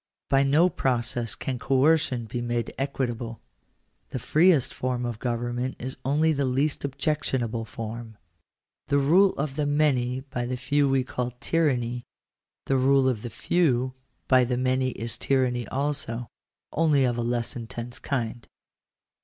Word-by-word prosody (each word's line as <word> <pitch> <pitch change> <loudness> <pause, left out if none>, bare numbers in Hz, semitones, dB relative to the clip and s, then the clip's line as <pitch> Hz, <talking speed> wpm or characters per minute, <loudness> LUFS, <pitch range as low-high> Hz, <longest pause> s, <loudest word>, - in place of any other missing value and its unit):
By 135 0 +5
no 145 +6 +4
process 120 - -1
can 130 -2 -4
coercion 135 -1 +2
be 120 +2 -4
made 120 0 -2
equitable. 120 -4 -2 0.7
The - - -4
freest 155 +2 +3
form 125 -1 -2
of 120 -2 -4
government 120 +1 -2
is 130 +2 -5
only 155 +4 +2
the 140 -1 0
least 135 +3 0
objectionable 130 -5 -1
form. 115 0 -7 0.7
The 140 - +2
rule 175 +8 +5
of 140 0 -3
the 150 -1 +1
many 130 -4 +1
by 125 -3 -4
the 130 0 -2
few 145 +2 +2
we 135 -1 +2
call 125 -1 -3
tyranny: 125 -6 0 0.6
the 135 - +2
rule 135 +1 +4
of 120 -5 0
the 120 - -5
few 130 -1 +1 0.3
by 130 -1 +5
the 125 0 0
many 130 +1 +1
is 115 0 -6
tyranny 125 -4 +1
also; 135 -4 -2 0.5
only 150 -3 +3
of 120 -1 +1
a 120 - -2
less 120 0 -1
intense 115 +1 -6
kind. 120 -3 -3
130 Hz, 145 wpm, -26 LUFS, 120-140 Hz, 0.7 s, By